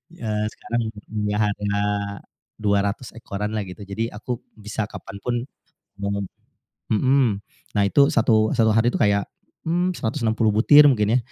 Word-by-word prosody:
Eee, 105 Hz, -4 st, -2 dB
sekarang 115 Hz, +1 st, -3 dB, 0.2 s
punya 105 Hz, -1 st, -1 dB
harga 105 Hz, 0 st, -1 dB, 0.8 s
200 100 Hz, +3 st, 0 dB
ekoran 105 Hz, -2 st, -5 dB
lah 105 Hz, -3 st, -3 dB
gitu. 90 Hz, +3 st, -9 dB
Jadi 100 Hz, +4 st, -3 dB
aku 115 Hz, +2 st, -5 dB, 0.2 s
bisa 105 Hz, 0 st, -4 dB
kapan 100 Hz, -1 st, -9 dB
pun 120 Hz, +4 st, -2 dB, 0.7 s
menem 100 Hz, 0 st, -1 dB, 0.6 s
mhm, 125 Hz, -2 st, +3 dB, 0.3 s
nah 100 Hz, -1 st, +2 dB
itu 140 Hz, +6 st, +4 dB
satu 110 Hz, -1 st, +3 dB
satu 110 Hz, -4 st, +3 dB
hari 115 Hz, +2 st, +4 dB
tuh -, -, -2 dB
kayak, 100 Hz, -1 st, +2 dB, 0.3 s
mmm, 175 Hz, +3 st, 0 dB
160 110 Hz, -3 st, 0 dB
butir 135 Hz, +8 st, +7 dB
mungkin 110 Hz, -3 st, +2 dB
ya -, -, +5 dB
110 Hz, 145 wpm, -23 LUFS, 105-115 Hz, 0.8 s, butir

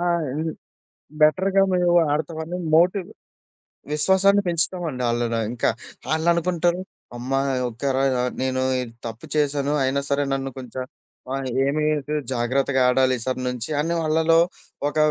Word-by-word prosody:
ఆ! -, -, -2 dB, 0.3 s
హ్మ్. 160 Hz, +2 st, -2 dB, 0.7 s
బెటర్‌గా 190 Hz, +6 st, +4 dB
మేము 180 Hz, -1 st, +2 dB, 0.2 s
ఆడతావని 160 Hz, +2 st, -3 dB, 0.2 s
మోటివ్ 180 Hz, +3 st, +3 dB, 0.9 s
విశ్వాసాన్ని 190 Hz, +6 st, +4 dB
పెంచుతామండి 165 Hz, -5 st, 0 dB
ఆళ్ళలో 115 Hz, -1 st, 0 dB
ఇంకా. 120 Hz, -, 0 dB, 0.4 s
ఆళ్ళనుకుంటరు" 170 Hz, +2 st, +1 dB, 0.4 s
అమ్మా! 130 Hz, +3 st, -1 dB, 0.3 s
ఒకే 120 Hz, +4 st, -3 dB
రా 135 Hz, -, +2 dB
య 125 Hz, -, 0 dB, 0.2 s
నేను 130 Hz, 0 st, 0 dB, 0.2 s
ఈడ 125 Hz, -2 st, -4 dB, 0.2 s
తప్పు 115 Hz, 0 st, -9 dB
చేశాను. 145 Hz, -1 st, +1 dB
అయినా 135 Hz, +2 st, +1 dB
సరే, 140 Hz, 0 st, +2 dB
నన్ను 135 Hz, 0 st, -2 dB
కొంచం 130 Hz, 0 st, -6 dB, 0.5 s
ఆహ్, 135 Hz, -1 st, -2 dB, 0.2 s
ఏమి 145 Hz, +3 st, 0 dB
అయితది 150 Hz, 0 st, -2 dB
జాగ్రత్తగా 130 Hz, +2 st, +1 dB
ఆడాలి 130 Hz, 0 st, +3 dB
ఈసారి 130 Hz, +2 st, -3 dB
నుంచి" 125 Hz, 0 st, -4 dB
అని 170 Hz, +2 st, -1 dB
వాళ్ళలో 160 Hz, +1 st, +3 dB, 0.5 s
ఒక 150 Hz, -, -7 dB
145 Hz, 130 wpm, -23 LUFS, 130-170 Hz, 0.9 s, బెటర్‌గా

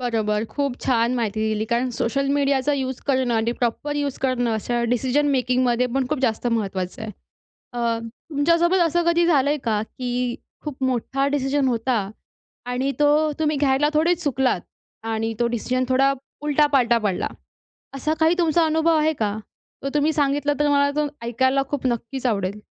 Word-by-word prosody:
बरोबर. 220 Hz, -3 st, 0 dB
खूप 280 Hz, -3 st, -1 dB
छान 235 Hz, -1 st, +1 dB
माहिती 220 Hz, -3 st, -1 dB
दिली 215 Hz, 0 st, -1 dB
कारण 240 Hz, +2 st, +1 dB
सोशल 275 Hz, +4 st, 0 dB
मीडियाचा 280 Hz, 0 st, +1 dB
यूज 260 Hz, -2 st, -3 dB
करणं 260 Hz, -3 st, +1 dB
आणि 225 Hz, +1 st, +1 dB
प्रॉपर 250 Hz, +5 st, -2 dB
यूज 285 Hz, -2 st, -2 dB
करणं 255 Hz, -3 st, 0 dB
अशा 235 Hz, +2 st, -1 dB
डिसिजन 265 Hz, +4 st, +1 dB
मेकिंगमध्येपण 250 Hz, 0 st, +1 dB
खूप 305 Hz, -, -1 dB
जास्त 230 Hz, 0 st, 0 dB
महत्त्वाचं 195 Hz, -5 st, -2 dB
आहे. 220 Hz, -, -5 dB, 0.6 s
अ, 235 Hz, -1 st, 0 dB, 0.3 s
तुमच्यासोबत 335 Hz, +5 st, +3 dB
असं 345 Hz, +2 st, +1 dB
कधी 340 Hz, 0 st, +3 dB
झालंय 290 Hz, -3 st, +3 dB
का? 215 Hz, -3 st, +1 dB
की 245 Hz, +1 st, -3 dB, 0.3 s
खूप 280 Hz, -3 st, -6 dB
मोठा 260 Hz, +2 st, 0 dB
डिसिजन 275 Hz, -1 st, +1 dB
होता 235 Hz, 0 st, 0 dB, 0.7 s
आणि 265 Hz, +3 st, 0 dB
तो 300 Hz, +1 st, +3 dB
तुम्ही 305 Hz, -2 st, +1 dB
घ्यायला 275 Hz, +1 st, +2 dB
थोडेच 335 Hz, +3 st, +2 dB
चुकलात 260 Hz, -, +1 dB, 0.5 s
आणि 225 Hz, +1 st, -1 dB
तो 240 Hz, -, +2 dB
डिसिजन 250 Hz, +2 st, -1 dB
थोडा 270 Hz, +2 st, +3 dB, 0.3 s
उलटापालटा 285 Hz, -5 st, +3 dB
पडला. 190 Hz, -3 st, 0 dB, 0.7 s
असा 305 Hz, +3 st, -1 dB
काही 320 Hz, +2 st, +4 dB
तुमचा 335 Hz, -1 st, +3 dB
अनुभव 320 Hz, +1 st, +2 dB
आहे 310 Hz, +1 st, +2 dB
का? 215 Hz, -6 st, -2 dB, 0.5 s
तो 275 Hz, -, -2 dB
तुम्ही 300 Hz, +2 st, +2 dB
सांगितला, 290 Hz, 0 st, +1 dB
तर 295 Hz, -, +3 dB
मला 285 Hz, 0 st, +3 dB
तो 300 Hz, 0 st, +2 dB, 0.2 s
ऐकायला 260 Hz, +3 st, +1 dB
खूप 280 Hz, -3 st, -2 dB
नक्कीच 245 Hz, +2 st, -2 dB
आवडेल. 205 Hz, -2 st, -1 dB
260 Hz, 160 wpm, -22 LUFS, 235-290 Hz, 0.7 s, काही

